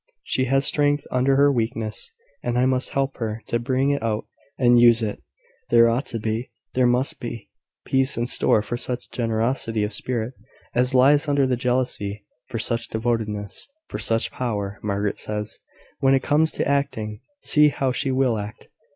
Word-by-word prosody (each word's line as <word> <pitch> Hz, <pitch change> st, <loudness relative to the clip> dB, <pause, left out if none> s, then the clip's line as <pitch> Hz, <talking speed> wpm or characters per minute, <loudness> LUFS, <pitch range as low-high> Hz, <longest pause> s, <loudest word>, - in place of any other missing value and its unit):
She 130 Hz, -, 0 dB
has 135 Hz, +2 st, +2 dB
strength 145 Hz, 0 st, +2 dB
under 130 Hz, +2 st, +2 dB
her 140 Hz, +1 st, +5 dB
weakness, 115 Hz, -3 st, -2 dB, 0.3 s
and 120 Hz, 0 st, -1 dB
I 125 Hz, -, +3 dB
must 130 Hz, 0 st, +1 dB
help 135 Hz, 0 st, -1 dB
her 110 Hz, -1 st, -4 dB
to 120 Hz, -, -1 dB
bring 130 Hz, +3 st, +1 dB
it 140 Hz, -, -1 dB
out 110 Hz, -1 st, -1 dB, 0.3 s
and 120 Hz, -1 st, +5 dB
use 120 Hz, -1 st, +6 dB
it. 105 Hz, -1 st, -3 dB, 0.5 s
There 115 Hz, 0 st, +6 dB
ought 125 Hz, +5 st, -1 dB
to 115 Hz, -, -3 dB
be, 110 Hz, +2 st, -3 dB, 0.2 s
there 125 Hz, -1 st, +3 dB
must 125 Hz, +3 st, 0 dB
be, 115 Hz, -3 st, -7 dB, 0.3 s
peace 135 Hz, +1 st, +1 dB
in 120 Hz, -, 0 dB
store 110 Hz, -3 st, +2 dB
for 120 Hz, +3 st, -3 dB
such 125 Hz, 0 st, -5 dB
generosity 115 Hz, -1 st, -1 dB
of 105 Hz, +1 st, -2 dB
spirit 120 Hz, +2 st, -3 dB, 0.4 s
as 125 Hz, +2 st, +1 dB
lies 145 Hz, +4 st, +5 dB
under 140 Hz, -1 st, +3 dB
the 130 Hz, -1 st, +1 dB
jealousy, 125 Hz, -5 st, -1 dB, 0.2 s
for 115 Hz, -, -4 dB
such 115 Hz, +1 st, 0 dB
devotedness, 110 Hz, -3 st, -3 dB, 0.2 s
for -, -, -5 dB
such 115 Hz, 0 st, +1 dB
power. 105 Hz, -5 st, -3 dB
Margaret 100 Hz, 0 st, -2 dB
says, 105 Hz, +1 st, -4 dB, 0.4 s
`When 135 Hz, 0 st, +5 dB
it 135 Hz, -, 0 dB
comes 160 Hz, +1 st, +3 dB
to -, -, -1 dB
acting, 110 Hz, -7 st, -1 dB, 0.2 s
see 150 Hz, 0 st, +5 dB
how 135 Hz, -2 st, -1 dB
she 125 Hz, +2 st, -1 dB
will 130 Hz, -4 st, +1 dB
act.' 105 Hz, +1 st, -8 dB
120 Hz, 175 wpm, -23 LUFS, 110-130 Hz, 0.5 s, use